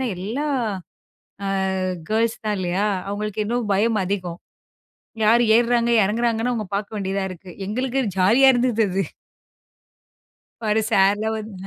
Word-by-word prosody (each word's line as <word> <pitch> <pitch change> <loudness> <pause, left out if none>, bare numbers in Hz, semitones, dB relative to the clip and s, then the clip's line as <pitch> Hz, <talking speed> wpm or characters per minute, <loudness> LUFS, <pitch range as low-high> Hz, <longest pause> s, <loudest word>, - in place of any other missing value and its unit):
எல்லா 225 +12 -3 1.0
அ - - -1 0.6
கேர்ல்ஸ் 225 +1 0
தான் 210 -1 0
இல்லையா? 185 +2 -1 0.2
அவங்களுக்கு 210 +1 -3
இன்னும் 235 -2 -2
பயம் 215 +2 +2
அதிகம். 180 -3 -3 0.9
யாரு 235 +3 +5
ஏறுறாங்க, 235 0 +2
இறங்குறாங்கன்னு 230 +3 0
அவங்க 215 -4 -3
பாக்க 205 +1 -3
வேண்டியதா 195 0 -2
இருக்கு. 185 0 -11 0.2
எங்களுக்கு 255 +4 -1 0.2
ஜாலியா 230 +9 +5
இருந்தது 240 -2 +2
அது! 190 +1 0 1.6
பாரு 220 0 +1
சாருலாம் 210 +1 +2
வந்து, 215 -1 -7
215 Hz, 120 wpm, -22 LUFS, 195-235 Hz, 1.6 s, யாரு